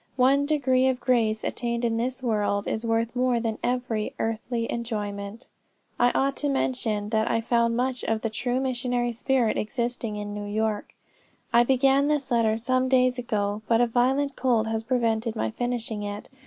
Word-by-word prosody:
One 275 +3 +4
degree 260 -4 +2
of 260 -1 +1
grace 225 -5 +1
attained 235 0 -2
in 225 -1 0
this 255 +3 -2
world, 210 -3 0
is 220 - -2
worth 230 +1 0
more 250 -1 +2
than 225 -1 -2
every 245 -4 -1
earthly 230 +1 -2
enjoyment." 210 -2 -4 0.5
"I 245 - +5
ought 275 0 +1
to 295 - -1
have 280 - +1
mentioned 220 -6 -1
that 220 -1 +1
I 230 - +2
found 235 0 +1
much 255 0 -1
of 220 -1 0
the 225 - -2
true 245 +3 -1
missionary 245 -2 -1
spirit 235 -1 +1
existing 235 -1 -2
in 205 0 -5
New 205 0 -5
York. 215 0 -2 0.6
"I 235 - +7
began 270 +2 +3
this 290 -3 -1
letter 225 -2 +3
some 255 +2 0
days 255 -1 +3
ago, 210 -3 -1
but 230 -1 +3
a 245 - +5
violent 265 +4 +1
cold 235 -4 +2
has 225 0 -2
prevented 230 -2 0
my 110 0 -1
finishing 235 - -3
it. 205 0 -6
235 Hz, 180 wpm, -26 LUFS, 220-255 Hz, 0.6 s, I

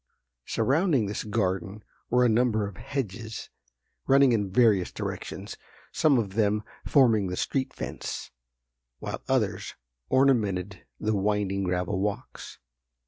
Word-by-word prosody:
Surrounding 145 - +2
this 100 +1 -3
garden 100 -1 -2 0.3
were 125 +1 +4
a - - +6
number 110 -2 +2
of 100 - -9
hedges 110 -4 -5 0.6
running 135 -1 +6
in 105 -4 +1
various 105 -3 +3
directions, - - -6 0.3
some 145 -4 +3
of 100 -5 -1
them 105 0 +1 0.2
forming 115 -8 +4
the 90 0 -4
street 135 -1 -1
fence, - - -6 0.7
while - - -5
others 105 -7 0 0.3
ornamented 100 -9 +1
the 110 0 0
winding 100 -1 0
gravel 90 +1 -1
walks. 105 +5 -4
105 Hz, 120 wpm, -27 LUFS, 100-125 Hz, 0.7 s, a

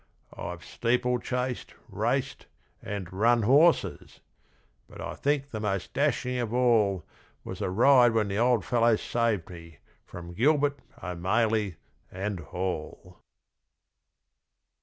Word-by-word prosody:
I've 85 0 -7
steeplechased, 125 +1 -1
raced, - - -2 0.3
and 95 -3 -6
'run 115 +4 +3
horses', 145 +9 +3 0.7
but - - -13
I - - -5
think 140 0 -1
the 110 - -4
most 100 -3 -3
dashing 125 -3 0
of 120 -3 -2
all 110 -8 +2 0.4
Was - - -7
the - - -1
ride 120 +4 +5
when 110 -2 +1
the 100 +1 -2
old 120 -3 +2
fellow 115 -1 +3
saved 115 -5 -1
me 85 -3 -12 0.3
from 85 0 -9
Gilbert, 145 - +2 0.2
O'Maley 100 +2 0 0.4
and 95 +1 -4
Hall! 90 -2 -5
115 Hz, 115 wpm, -27 LUFS, 95-125 Hz, 0.7 s, ride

